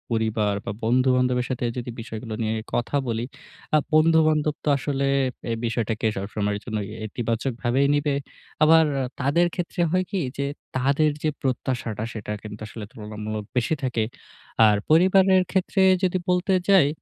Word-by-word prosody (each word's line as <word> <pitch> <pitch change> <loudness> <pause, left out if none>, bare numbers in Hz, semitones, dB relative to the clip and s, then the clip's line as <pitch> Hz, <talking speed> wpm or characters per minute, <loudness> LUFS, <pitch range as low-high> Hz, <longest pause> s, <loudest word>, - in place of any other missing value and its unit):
পরিবার 110 -2 0
বা - - -2
বন্ধু-বান্ধবের 125 +1 +2
সাথে 125 -1 -2
যদি 120 0 -4
বিষয়গুলো 110 0 -7
নিয়ে 110 0 0 0.2
কথা 120 +4 -1
বলি 115 0 -1 0.5
আ - - +7 0.2
বন্ধু-বান্ধব 155 -1 +4
তো - - +2
আসলে 140 0 -1 0.5
এই 115 - -1
বিষয়টাকে 115 -1 -1
সবসময়ের 100 +1 -2
জন্য 110 -3 -3 0.3
ইতিবাচকভাবে 120 +3 -2
নিবে। 145 -1 +1 0.5
আবার 160 +1 +6 0.3
তাদের 145 +6 +3
ক্ষেত্রে 175 0 -3
হয় 185 +1 +2
কি 200 - -1 0.2
যে 140 - -1 0.3
তাদের 140 +4 +2
যে 155 - +2
প্রত্যাশাটা 125 -4 -2
সেটা 105 -1 -6
কিন্তু 105 0 -9
আসলে 105 0 -8
তুলনামূলক 105 0 -6
বেশি 125 +5 +1
থাকে। 120 -3 0 0.6
আর 105 - +4
পরিবারের 185 +3 +5
ক্ষেত্রে 190 +1 +1 0.2
যদি 185 0 +2
বলতে 180 +2 +2 0.2
যাই 185 -8 +6
125 Hz, 140 wpm, -24 LUFS, 110-155 Hz, 0.6 s, আ